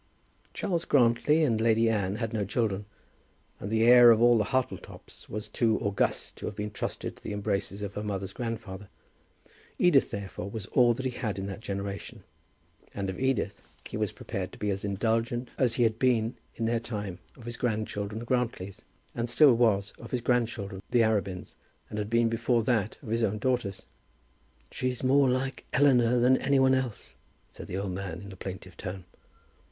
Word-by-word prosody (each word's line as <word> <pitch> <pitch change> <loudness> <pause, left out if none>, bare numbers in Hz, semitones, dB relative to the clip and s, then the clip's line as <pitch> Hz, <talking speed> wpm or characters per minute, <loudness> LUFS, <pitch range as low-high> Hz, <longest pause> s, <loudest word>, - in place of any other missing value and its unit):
Charles 170 -3 -1
Grantly 140 +4 +3
and 115 -7 +2
Lady 115 0 +3
Anne 100 -3 0
had 115 0 -3
no 105 -2 0
children, 105 -1 -1 0.7
and 100 - -5
the 110 +1 +2
heir 120 0 +9
of 115 -2 +6
all 120 +1 +6
the 105 - +1
Hartletops 130 +1 -4
was 105 +1 -5
too 115 -3 +1
august 100 -3 -1
to - - -5
have 105 - -5
been 105 0 -4
trusted - - -4
to - - -21
the - - -4
embraces 100 -1 -2
of 100 -1 -5
her 105 - -4
mother's 100 -2 -4
grandfather. 105 -5 -5 0.9
Edith, 175 -7 +4
therefore, 100 -1 -5
was 105 -1 -6
all 120 +1 +4
that 130 - -5
he 130 - 0
had 110 -6 -3
in 95 - -3
that 100 0 -5
generation, 100 -1 -5 0.7
and 100 -1 -2
of - - -8
Edith 130 -6 0 0.3
he - - -7
was - - -1
prepared 95 -1 -5
to - - -12
be 105 -1 -1
as 100 +1 -3
indulgent 115 +4 -1
as 120 -3 +1
he 120 - +2
had 110 -1 +1
been, 120 -3 +2 0.2
in 115 - -2
their 115 +1 +1
time, 105 -6 -5 0.2
of 120 - -13
his 120 0 -4
grandchildren 110 -3 -2
the 115 - -5
Grantlys, 115 -6 -2 0.3
and 120 0 -2
still 140 +2 +6
was 105 -4 +2
of 115 - -9
his 125 - -2
grandchildren 115 -5 -1
the 120 -2 +4
Arabins, 100 -4 -1 0.4
and 105 - -3
had 105 0 -3
been 115 0 +3
before 115 +1 +1
that 110 -3 0
of 115 - -8
his 115 +1 0
own 110 -1 +1
daughters. 120 -4 -1 0.9
"She's 125 -1 -2
more 135 +1 +4
like 130 +2 -2
Eleanor 125 -3 +4
than 125 +2 +5
any 140 0 +2
one 130 0 +5
else," 130 -5 -2 0.4
said - - -10
the 95 - -4
old 100 -1 -2
man 95 -1 -5
in 100 - -9
a - - -9
plaintive 95 -1 -8
tone. 95 0 -6
115 Hz, 190 wpm, -28 LUFS, 100-120 Hz, 0.9 s, heir